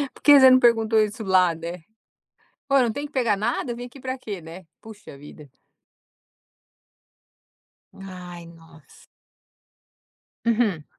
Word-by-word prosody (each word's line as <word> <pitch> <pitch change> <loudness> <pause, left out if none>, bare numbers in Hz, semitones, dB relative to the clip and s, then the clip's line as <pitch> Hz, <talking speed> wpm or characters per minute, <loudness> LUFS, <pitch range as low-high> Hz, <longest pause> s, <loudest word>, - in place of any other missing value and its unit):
Por - - -19
que 290 -1 +7
você 260 0 +8
não 255 0 +6
perguntou 225 -2 +2
isso 215 +2 -2
lá, 185 -3 +2
né. 170 +1 -8 0.8
"Pô, 275 0 +2
não 240 -3 +1
tem 285 +5 -6
que 300 - -30
pegar 235 -6 0
nada? 235 +3 -3
Vem 245 +1 -8
aqui 270 +3 -16
para 260 0 -5
quê, 200 -7 -7
né". 165 +3 -12 0.2
Puxa 215 -10 -13
vida. 145 0 -14 2.4
Ai, 180 -3 -11
nossa. 165 -2 -19 1.4
Uhum. 215 -9 0
210 Hz, 130 wpm, -23 LUFS, 170-240 Hz, 2.4 s, você